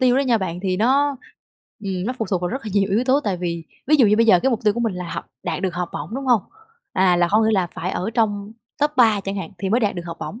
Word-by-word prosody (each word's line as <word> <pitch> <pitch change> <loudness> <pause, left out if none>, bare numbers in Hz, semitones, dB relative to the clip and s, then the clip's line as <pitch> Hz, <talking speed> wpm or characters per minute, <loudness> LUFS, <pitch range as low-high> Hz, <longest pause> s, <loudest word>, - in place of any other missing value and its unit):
tiêu 255 0 +4
đó - - +3
nha 245 -5 +2
bạn, 180 -2 -3
thì 185 -1 0
nó, 275 +6 +2 0.7
ừm, 185 -2 -2
nó 250 - -1
phụ 220 - -1
thuộc 185 -2 +1
vào 175 - -1
rất 265 +3 -4
là 215 - -5
nhiều 195 -1 +2
yếu 225 +5 +2
tố. 270 +3 +3
Tại 195 -3 0
vì, 170 -2 -4 0.2
ví 305 +2 +5
dụ 250 -6 +5
như 210 +1 +4
bây 230 0 +4
giờ 180 -5 +6
cái 265 - +3
mục 235 - -1
tiêu 210 - +4
của 235 - -2
mình 225 -5 0
là 180 -1 -5
học, - - -5 0.2
đạt 180 - -3
được 185 -2 -1
học 180 -1 -2
bổng, 225 - -6
đúng 270 0 -4
hông? 240 -6 +4 0.5
À, 185 -2 +3
là 175 0 +3
hông 215 +2 +4
những 220 - +2
là 190 -4 +2
phải 180 - -3
ở 190 +4 -3
trong 205 -2 0 0.3
top 295 +1 +2
3 220 -5 +5
chẳng 195 +1 -4
hạn 185 -4 -5
thì 195 - -2
mới 235 +4 +3
đạt 205 -3 +1
được 175 - -5
học 170 - -6
bổng. 225 - -6
205 Hz, 310 wpm, -21 LUFS, 185-240 Hz, 0.7 s, giờ